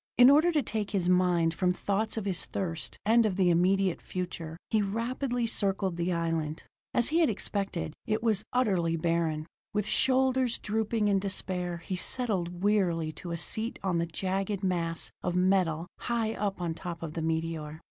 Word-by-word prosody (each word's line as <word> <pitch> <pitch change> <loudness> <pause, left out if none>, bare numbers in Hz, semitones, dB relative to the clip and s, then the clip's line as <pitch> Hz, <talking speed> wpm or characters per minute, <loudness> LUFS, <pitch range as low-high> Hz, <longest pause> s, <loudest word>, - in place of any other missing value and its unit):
In 250 +2 +9
order 315 +5 +5
to 300 -3 +2
take 215 -2 -2
his 190 -4 0
mind 180 -2 +3
from 180 0 +1
thoughts 210 +4 -1
of 215 - -2
his 190 -3 -1
thirst 170 -4 -4
and 230 +2 +5
of 210 -4 0
the 185 -2 +3
immediate 185 +1 +2
future, 170 -3 -5
he 220 - +3
rapidly 240 +4 -1
circled 195 -4 0
the 175 +1 -1
island. 165 -2 -1 0.3
As 240 - +3
he 325 +3 +2
had 325 - +4
expected, 195 -6 -2
it 215 +1 0
was 215 -3 +2
utterly 185 -10 +1
barren. 165 -2 0 0.3
With 210 -1 +1
shoulders 260 0 +3
drooping 220 0 0
in 200 -1 +3
despair 185 -2 -2
he 190 - -2
settled 180 -4 -1
wearily 175 -6 +2
to 175 - -9
a 170 - -2
seat 220 +7 -2
on 180 -3 +1
the 170 - 0
jagged 195 +4 -2
mass 170 -3 -1
of 180 -1 -2
metal 180 -3 +2
high 230 -2 -1
up 200 -3 -2
on 170 -2 -1
top 170 0 -6
of 155 -2 -5
the 165 - -3
meteor. 160 -1 -2
190 Hz, 180 wpm, -29 LUFS, 170-215 Hz, 0.3 s, In